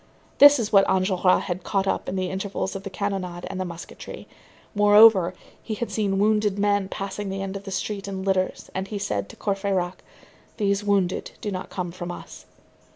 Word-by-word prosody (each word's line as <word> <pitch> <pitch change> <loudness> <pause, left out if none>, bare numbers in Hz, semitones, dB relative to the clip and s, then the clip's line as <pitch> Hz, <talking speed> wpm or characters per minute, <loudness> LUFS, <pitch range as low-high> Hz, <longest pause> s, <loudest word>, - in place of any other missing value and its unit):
This 290 0 +9
was 220 -4 -3
what 195 -1 +6
Enjolras 185 -1 +2
had 180 -1 -4
caught 195 -1 -1
in 185 - -3
the 185 -1 -2
intervals 190 0 -3
of 195 - -4
the 200 - -6
cannonade 185 -3 -3
and 190 -1 -4
the - - -2
musketry. 170 -1 -9 0.5
Moreover, 205 -3 +6 0.3
he 220 - -4
had 235 +2 -4
seen 200 -3 0
wounded 210 0 +2
men 205 -1 +1
passing 195 +1 -4
the 195 0 -3
end 195 0 -5
of 195 0 -7
the - - -6
street 200 +1 -3
in 190 -1 -4
litters, 190 -1 -1
and 190 +1 -3
he 210 - -4
said 105 - -2
to - - -11
Courfeyrac:—"Those 195 +1 -3
wounded 195 -3 0
do 210 - -4
not 185 -1 -5
come 180 -2 -4
from 175 0 -6
us." - - -10
195 Hz, 185 wpm, -24 LUFS, 185-205 Hz, 0.5 s, This